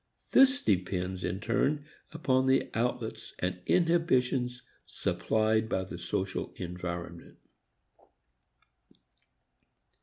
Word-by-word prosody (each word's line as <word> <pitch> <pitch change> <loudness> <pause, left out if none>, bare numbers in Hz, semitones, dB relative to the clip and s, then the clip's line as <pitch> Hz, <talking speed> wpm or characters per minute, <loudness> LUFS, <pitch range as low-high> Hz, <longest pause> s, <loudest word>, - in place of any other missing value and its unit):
This 270 +1 +6
depends 90 - 0
in 90 +2 -2
turn 140 +7 0 0.3
upon 130 -5 +1
the 130 0 +2
outlets 115 0 -2
and 90 0 -2
inhibitions 130 -8 +2 0.2
supplied 110 0 0
by 95 - 0
the 90 -2 -8
social 95 +2 -3
environment. 85 -1 -6
110 Hz, 85 wpm, -30 LUFS, 90-130 Hz, 0.3 s, This